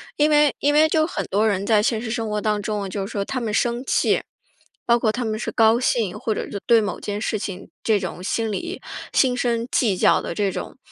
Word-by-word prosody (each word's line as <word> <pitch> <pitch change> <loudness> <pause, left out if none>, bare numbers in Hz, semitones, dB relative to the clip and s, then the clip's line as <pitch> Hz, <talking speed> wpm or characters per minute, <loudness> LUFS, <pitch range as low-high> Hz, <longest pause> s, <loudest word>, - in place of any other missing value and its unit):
因 300 +1 +3
为 295 -1 +4
因 290 +1 +2
为 305 +1 +5
就 315 0 +2
很 335 - -4
多 205 +3 +1
人 200 -2 0
在 215 -2 +3
现 225 -1 0
实 235 - -5
生 225 -1 -2
活 210 0 -1
当 210 0 0
中， 205 -2 -3
就 195 0 -3
是 205 - -8
说 200 -1 -2
他 255 +3 -3
们 220 -3 -3
生 240 +3 0
气， - - +2 0.6
包 235 0 +4
括 220 -2 +2
他 245 +2 -3
们 215 -1 -2
是 - - -3
高 225 0 +4
兴， 225 -7 0
或 220 - -1
者 - - -4
就 200 - -5
对 235 -1 +6
某 200 -4 -3
件 205 0 -4
事 215 0 -2
情 195 -2 -6
这 215 -2 +2
种 180 -1 -6
心 225 +3 -1
理， 345 - -4 0.3
心 255 -2 +3
生 235 -1 -1
计 210 -7 +2
较 - - +4
的 - - -5
这 200 0 0
种 - - -6
220 Hz, 265 characters per minute, -22 LUFS, 205-240 Hz, 0.6 s, 对